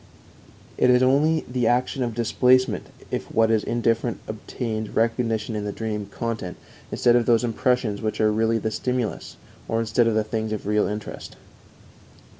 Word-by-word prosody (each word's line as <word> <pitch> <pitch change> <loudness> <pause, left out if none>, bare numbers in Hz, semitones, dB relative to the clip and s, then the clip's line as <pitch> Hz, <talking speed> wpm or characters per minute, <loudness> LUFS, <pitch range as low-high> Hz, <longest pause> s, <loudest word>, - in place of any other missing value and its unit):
_It 125 - +4
is 125 0 +5
only 150 +5 +3
the 125 -2 0
action 125 +2 +1
of 120 -3 -2
displacement 125 +1 +2 0.2
if - - -4
what 115 0 +3
is 110 -1 +2
indifferent 115 0 0
obtains 110 0 -4
recognition 115 -1 0
in 105 - -2
the 105 - -3
dream 105 -2 -4
content 110 -4 -4 0.3
instead 120 -1 +3
of 120 -2 +2
those 115 -1 +4
impressions 120 -2 0
which 110 -1 -2
are 110 -1 +3
really 115 +1 +1
the 110 0 -2
stimulus, 125 0 -3 0.3
or 115 - 0
instead 115 +1 +2
of 115 - +1
the 110 - +2
things 110 0 -3
of 105 - -5
real 105 +1 +2
interest_. 105 0 -6
115 Hz, 165 wpm, -24 LUFS, 110-125 Hz, 0.3 s, is